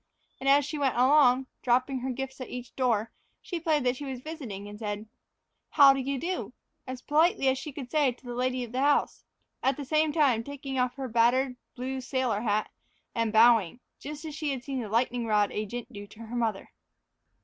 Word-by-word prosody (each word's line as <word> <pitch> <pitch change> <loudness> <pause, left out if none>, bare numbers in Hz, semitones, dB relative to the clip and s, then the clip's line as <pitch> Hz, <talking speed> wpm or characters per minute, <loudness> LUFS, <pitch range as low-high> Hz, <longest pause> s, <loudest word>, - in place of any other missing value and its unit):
And 270 +1 0
as 280 0 +5
she 300 +1 -4
went 275 -3 +1
along, 260 0 +5 0.2
dropping 255 +2 +1
her 260 +2 -3
gifts 265 +1 -5
at 255 - -6
each 250 -1 -8
door, 230 -4 +1 0.3
she 350 - -5
played 310 -4 +1
that 250 0 +1
she 290 - -8
was 265 -3 -5
visiting 250 - -7
and 205 0 -10
said, 210 -1 -4 0.6
"How 280 -3 +7
do 270 - -2
you 270 +1 -2
do?" 355 +7 -3 0.3
as 255 -1 -6
politely 305 -2 +3
as 265 0 0
she 300 - -6
could 270 -2 -7
to 290 -6 +2
the 245 -1 -6
lady 255 +1 -1
of 235 - -8
the 255 - -2
house, 290 +1 +2 0.4
at 265 0 +1
the 285 - -5
same 310 +2 +2
time 275 -8 +3
taking 275 0 -5
off 250 -1 0
her 270 -1 -4
battered 250 +3 +2 0.2
blue 260 +1 -4
sailor 255 -5 -1
hat 215 -2 0 0.4
and 230 -1 0
bowing, 225 -3 +5 0.2
just 300 +2 -7
as 310 - -5
she 305 0 -3
had 265 -3 -3
seen 270 -1 -3
the 220 - -6
lightning 235 +1 0
rod 210 -2 +2
agent 235 +4 -5
do 205 0 -8
to 210 - -17
her 230 +1 -7
mother. 225 -4 -2
255 Hz, 205 wpm, -28 LUFS, 235-280 Hz, 0.6 s, How